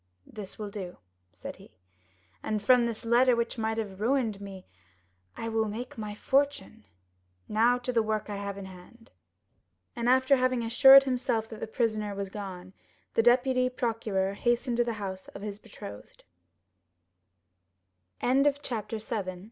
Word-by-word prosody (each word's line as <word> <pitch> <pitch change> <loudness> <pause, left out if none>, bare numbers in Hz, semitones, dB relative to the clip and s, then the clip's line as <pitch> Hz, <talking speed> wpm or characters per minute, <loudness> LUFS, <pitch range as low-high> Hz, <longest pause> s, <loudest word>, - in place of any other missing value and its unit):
"This 205 -3 -9
will 210 -2 -6
do," 190 -4 -7 0.3
said - - -9
he, - - -18 0.6
"and 215 -1 -1
from 245 +1 +5
this 230 +1 -5
letter, 245 +2 +4
which 235 0 -2
might 220 0 -1
have 205 -3 -5
ruined 230 -4 0
me, 195 -2 -9 0.7
I 230 - -4
will 225 -1 0
make 235 +4 -6
my 210 -2 -6
fortune. 275 - 0 0.6
Now 230 +3 +3
to 250 0 -3
the 230 - +3
work 215 -1 -2
I 205 -1 -4
have 200 0 -5
in 200 - -7
hand." 190 +6 -14 0.8
And 235 0 0
after 260 +2 +5
having 255 -1 +1
assured 270 +4 +8
himself 250 -4 -1
that 220 - -9
the - - -4
prisoner 215 -3 -1
was 195 -1 -4
gone, 185 -3 -7 0.4
the - - +4
deputy 255 +2 +3
procureur 225 -6 -1
hastened 240 +3 0
to 240 - +4
the 235 -1 -2
house 190 -3 -6
of 200 - -8
his 205 -1 -5
betrothed. 195 - -11 2.0
0107m 275 +3 +3
Chapter 225 -2 -4
8. 205 -4 -4
225 Hz, 155 wpm, -29 LUFS, 200-245 Hz, 2.0 s, assured